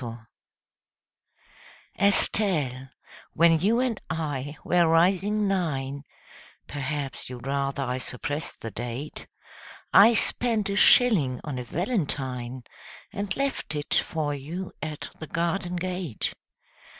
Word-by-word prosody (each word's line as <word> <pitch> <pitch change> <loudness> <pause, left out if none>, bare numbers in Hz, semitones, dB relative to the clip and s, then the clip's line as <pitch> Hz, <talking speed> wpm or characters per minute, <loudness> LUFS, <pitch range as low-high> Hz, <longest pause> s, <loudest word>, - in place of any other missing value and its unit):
] - - -5 2.0
ESTELLE, 160 - +2 0.4
when 165 0 +5
you 215 +8 +3
and 250 -4 0
I 145 -3 -3
were 175 -1 +4
rising 190 +5 +3
nine 140 -7 -1 0.6
Perhaps 140 -2 -4
you'd 125 0 -8
rather 140 0 -1
I 125 0 -2
suppressed 145 +5 -4
the 115 - -5
date 120 +7 -6 0.7
I 225 +4 +8
spent 225 -3 +1
a - - -1
shilling 195 - +5
on 140 -5 -4
a - - -3
valentine 130 - -2 0.5
And 200 -1 -3
left 275 - -2
it 145 0 -3
for 155 -3 0
you 165 +7 -5
at 155 -2 -5
the 160 - -6
garden 175 +3 -1
gate. 180 - -3
155 Hz, 115 wpm, -26 LUFS, 135-190 Hz, 2.0 s, I